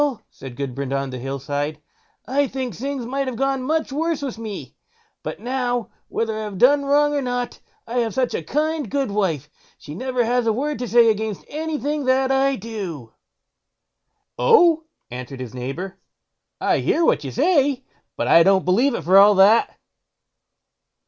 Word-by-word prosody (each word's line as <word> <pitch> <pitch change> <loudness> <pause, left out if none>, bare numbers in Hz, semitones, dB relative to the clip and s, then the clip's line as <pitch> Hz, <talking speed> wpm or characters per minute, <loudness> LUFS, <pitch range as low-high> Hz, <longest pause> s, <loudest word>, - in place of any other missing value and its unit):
said 130 -2 -10
Gudbrand 135 0 -4
on 135 -1 -2
the 130 - -6
Hill 135 +2 -4
side, 145 +2 -3 0.5
"I 280 +2 +1
think 260 -2 -4
things 270 0 -4
might 270 +2 -2
have 255 - -3
gone 270 +2 0
much 310 +3 -1
worse 320 +1 -1
with 250 -5 -5
me; 215 -3 -7 0.5
but - - -6
now, 245 -2 -2 0.2
whether 225 -1 -2
I 215 - -4
have 210 -3 -6
done 280 +6 +4
wrong 295 +1 +3
or 285 - 0
not, 245 -1 -3 0.3
I 240 +2 -2
have 230 -2 -1
so 260 -1 +3 0.2
kind 300 - -1
a - - -12
goodwife, 200 - -1 0.3
she 150 - -10
never 250 +6 -1
has 245 0 +1
a 220 - +3
word 290 +6 -2
to 245 - -3
say 230 0 +5
against 215 -2 -4
anything 300 -2 -3
that 260 +1 +2
I 270 0 +2
do." 185 - -7 1.3
"Oh!" 345 -9 +5 0.3
answered 125 +2 -7
his 125 -2 -7
neighbour, 135 +10 -6 0.6
"I - - +1
hear 335 - +1
what 150 - +2
you 135 - -4
say, 280 - +1 0.3
but - - -1
I 165 - +7
don't 190 +2 +4
believe 235 +9 +3
it - - -4
for 190 +3 +6
all 205 +1 +7
that." 200 +4 +4
240 Hz, 170 wpm, -22 LUFS, 185-275 Hz, 1.3 s, I